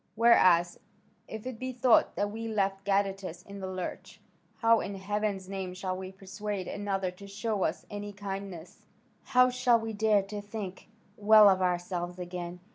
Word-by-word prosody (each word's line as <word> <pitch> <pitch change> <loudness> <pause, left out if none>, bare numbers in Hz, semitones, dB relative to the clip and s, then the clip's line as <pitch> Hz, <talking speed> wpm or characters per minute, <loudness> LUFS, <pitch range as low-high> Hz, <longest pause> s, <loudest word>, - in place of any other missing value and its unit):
Whereas, 185 -7 +5 0.5
if 220 +1 -8
it 255 -3 -6
be 255 0 -3
thought 250 -1 +3
that 205 0 -1
we 225 +1 -5
left 195 -2 -1
Gadatas 195 -3 -1
in 200 0 -9
the 190 - -5
lurch, 185 -1 -6 0.4
how 230 -1 +4
in 200 - -4
heaven's 200 0 -2
name 190 -2 -5
shall 185 0 -3
we 185 0 -7
persuade 195 0 -5
another 195 -2 -2
to 200 +2 -13
show 210 0 -2
us - - -2
any 205 0 -6
kindness? 195 -4 -7 0.4
How 250 0 +4
shall 250 -1 +3
we 225 0 -5
dare 210 -1 +3
to 205 +1 -6
think 205 -3 -7 0.3
well 215 0 +7
of 190 -1 +4
ourselves 175 0 -1
again? 175 0 -6
200 Hz, 165 wpm, -29 LUFS, 185-215 Hz, 0.5 s, well